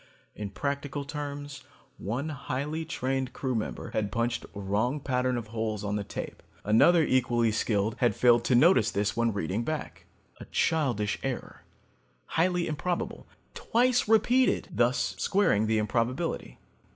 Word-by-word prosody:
In 105 -1 -5
practical 140 +5 -3
terms, 145 -1 -6 0.4
one 125 +9 -3
highly 145 +3 -3
trained 135 -3 -2
crew 130 -2 -2
member 110 -3 -4
had 105 -2 -1
punched 115 +2 -1
a 100 - -10
wrong 105 +8 0
pattern 125 -2 0
of 110 -2 -6
holes 110 -2 -3
on 100 0 -2
the 105 - -2
tape. - - -7 0.2
Another 160 - +5
equally 120 -4 +2
skilled 110 0 0
had 120 - +2
failed 120 -1 +4
to 125 - +3
notice 130 - +5
this 100 -1 -1
when 115 0 +2
reading 100 +1 -2
back. 155 +4 -5 0.3
A - - -9
childish 125 -11 0
error, - - -5 0.6
highly 175 +1 +1
improbable; 170 +3 -3 0.3
twice 245 0 +2
repeated, 240 +4 +3
thus 120 +3 +1
squaring 110 - +2
the 110 0 +2
improbability. 120 - -1
125 Hz, 140 wpm, -28 LUFS, 110-150 Hz, 0.6 s, Another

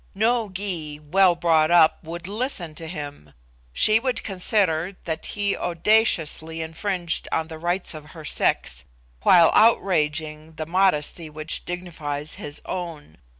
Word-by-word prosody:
No 225 +1 +1
Gy, 175 -6 -4
well 180 +4 +3
brought 160 -2 +3
up, 170 -1 +4
would 170 +2 -7
listen 205 - -3
to 165 +1 -7
him; 145 - -8 0.4
she 215 - +4
would 255 0 -2
consider 185 -2 0
that 160 -1 -4
he 205 -1 0
audaciously 165 -4 +1
infringed 170 +2 -2
on 160 0 -1
the 160 -1 -8
rights 175 +3 -1
of 155 -1 -9
her 155 0 -12
sex, 65 - 0 0.4
while 170 -2 +6
outraging 155 -7 +2
the 155 0 -5
modesty 170 -2 +1
which 155 +1 -2
dignifies 155 -4 -5
his 145 0 -6
own. 165 - -6
165 Hz, 135 wpm, -23 LUFS, 155-190 Hz, 0.4 s, while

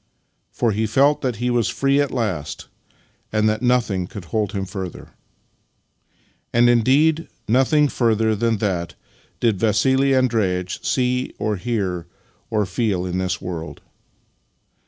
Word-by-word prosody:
" - - -48
For 115 - 0
he 110 +2 0
felt 140 +7 +3
that 125 -4 -1
he 120 +3 -1
was 120 -2 +1
free 140 +1 +2
at 145 - 0
last, 100 - -3 0.7
and 110 0 +2
that 110 0 0
nothing 120 -8 +1
could 100 -5 -9
hold 105 +5 -1
him 100 -2 -2
further. 95 -2 -7 1.4
And, 120 +1 +4
indeed, 140 +7 +3 0.2
nothing 135 +6 +3
further 110 -4 +1
than 115 +1 +1
that 95 -5 -2 0.4
did 110 -5 +1
Vassili 130 +5 +3
Andreitch 100 -8 0
see 125 0 0
or 110 -1 -1
hear 95 -5 -2 0.4
or 105 -2 +1
feel 95 -1 -1
in 90 0 -2
this 95 -1 -1
world. 85 -3 -6
110 Hz, 135 wpm, -21 LUFS, 95-125 Hz, 1.4 s, And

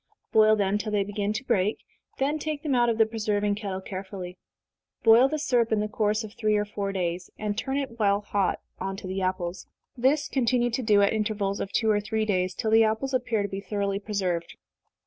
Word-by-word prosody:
Boil 215 0 +6
them 200 0 +1
till 215 0 -3
they 205 -1 +2
begin 205 0 -2
to 220 +5 -3
break, 210 -5 +1 0.4
then 290 +3 0
take 300 -1 -4
them 295 -3 0
out 240 -1 +3
of 225 - 0
the 225 - +5
preserving 210 -2 0
kettle 200 -2 -4
carefully. 190 -1 -7 0.7
Boil 230 +3 +7
the 310 +3 -2
syrup 245 -6 +1
in 220 - +2
the 210 - 0
course 215 +1 0
of 215 -1 -9
three 215 -2 +1
or 205 - 0
four 200 -1 -3
days, 180 -2 -3
and 210 -1 -2
turn 265 +5 -2
it 260 -5 -4
while 200 -1 +3
hot 200 -2 -1 0.2
on 195 0 -3
to - - -8
the 190 +1 -3
apples. 185 -1 -2 0.3
This 275 +4 +2
continue 245 -2 +1
to 245 - -1
do 210 -3 +4
at 200 - +3
intervals 210 -2 -1
of 195 - -4
two 220 -2 +2
or 205 -1 +2
three 220 +1 -1
days, 185 -3 0
till 220 - -1
the 225 0 +6
apples 220 +5 0
appear 235 -4 0
to - - -1
be 195 0 -5
thoroughly 200 0 -2
preserved. 185 -5 -2
210 Hz, 220 wpm, -26 LUFS, 200-230 Hz, 0.7 s, Boil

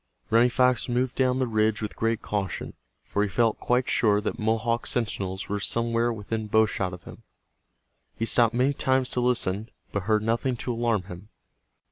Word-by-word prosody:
Running 115 +2 +5
Fox 125 -1 +2
moved 125 +1 0
down 130 -1 +1
the 130 - +1
ridge 110 -2 +1
with 105 -2 -5
great 115 -1 -1
caution, 100 -3 -3 0.3
for 100 - -2
he 105 - +1
felt 110 +3 +1
quite 125 +1 +1
sure 105 -3 +3
that 105 - -4
Mohawk 115 +2 0
sentinels 100 -5 -2
were 105 0 -2
somewhere 115 +2 +1
within 110 0 -4
bow 110 +1 +4
shot 100 -3 -2
of 90 -1 -10
him. - - -12 0.9
He 115 - -2
stopped 120 0 +3
many 130 +3 +2
times 130 -2 +1
to 125 - 0
listen, 115 -4 0 0.2
but 100 -2 -3
heard 110 -1 +3
nothing 115 +3 0
to 120 - -3
alarm 115 -4 0
him. 95 +2 -11
115 Hz, 180 wpm, -26 LUFS, 105-120 Hz, 0.9 s, Running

